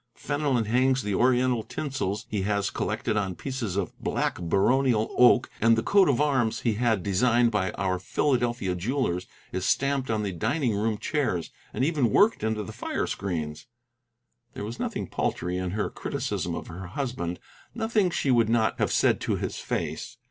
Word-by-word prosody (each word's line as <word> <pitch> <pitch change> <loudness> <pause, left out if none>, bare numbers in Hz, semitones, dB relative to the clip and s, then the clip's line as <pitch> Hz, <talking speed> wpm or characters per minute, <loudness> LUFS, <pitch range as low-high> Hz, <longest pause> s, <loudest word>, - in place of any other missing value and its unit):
Fenelon 145 -5 0
hangs 130 +4 +2
the 105 -1 -2
Oriental 125 +2 +3
tinsels 120 -6 -3
he 105 -2 -2
has 100 0 0
collected 110 - -2
on 95 -3 -1
pieces 125 -4 -4
of 100 -4 -2
black - - -1
baronial 110 +6 +2
oak, 125 0 +6
and 115 0 +5
the 115 - 0
coat 195 - +4
of 135 - +2
arms 130 -7 +1
he 115 - +1
had 110 -3 +1
designed 120 +4 +3
by 100 -4 0
our 95 -1 -1
Philadelphia 120 -2 0
jewellers 90 -2 -1 0.2
is 95 - -3
stamped 135 +3 +1
on 110 -1 0
the 100 - -2
dining 115 - 0
room 105 +1 0
chairs, 125 - -1 0.2
and 130 - 0
even 145 -7 +2
worked 210 - +4
into 110 -1 0
the - - -8
fire - - -2
screens." 80 -5 -4 0.9
There - - -4
was 115 +3 -7
nothing - - -2
paltry 90 +1 -2
in 90 -1 -2
her 105 +3 -2
criticism - - -3
of - - -5
her 90 +2 -8
husband, 90 -6 -3 0.4
nothing 225 -4 +1
she 145 -5 0
would 115 -3 +3
not 115 -2 +2
have - - +1
said - - +3
to - - 0
his - - -4
face. - - -4
115 Hz, 175 wpm, -27 LUFS, 100-130 Hz, 0.9 s, oak